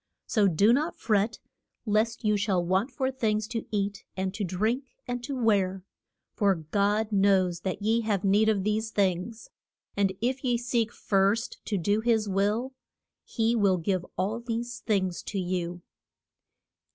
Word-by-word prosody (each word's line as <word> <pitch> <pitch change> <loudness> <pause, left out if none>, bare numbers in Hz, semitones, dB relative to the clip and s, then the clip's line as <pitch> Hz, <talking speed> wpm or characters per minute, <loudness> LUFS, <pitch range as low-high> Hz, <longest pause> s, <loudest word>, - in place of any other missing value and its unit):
So 210 -3 +3
do 200 +6 +4
not 305 +6 0
fret 215 +1 +1 0.5
lest 220 +2 +1
you 210 0 +3
shall 195 -4 +1
want 190 +7 +1
for 260 0 -1
things 215 -5 0
to 230 -2 -4
eat, 200 -1 -2
and 190 0 -1
to 205 - -3
drink, 220 +9 -1
and 245 0 -3
to 275 +2 -4
wear; 195 -5 +1 0.5
for 200 -2 +2
God 205 +7 0
knows 195 -3 +3
that 190 +2 -4
ye 225 +2 +2
have 210 -3 -1
need 205 +3 +4
of 200 -3 +1
these 215 +2 0
things, 200 +2 -1 0.4
and 200 -1 +2
if 250 +4 -1
ye 245 -2 +2
seek 235 -1 0
first 200 +3 0
to 205 - -1
do 205 +4 +1
his 220 -2 +2
will, 205 +7 0 0.5
he 230 0 0
will 200 -4 +3
give 180 +1 -1
all 210 +5 -1
these 235 0 -4
things 190 -6 -1
to 200 - -4
you. 175 -1 -3
210 Hz, 160 wpm, -28 LUFS, 195-230 Hz, 0.5 s, do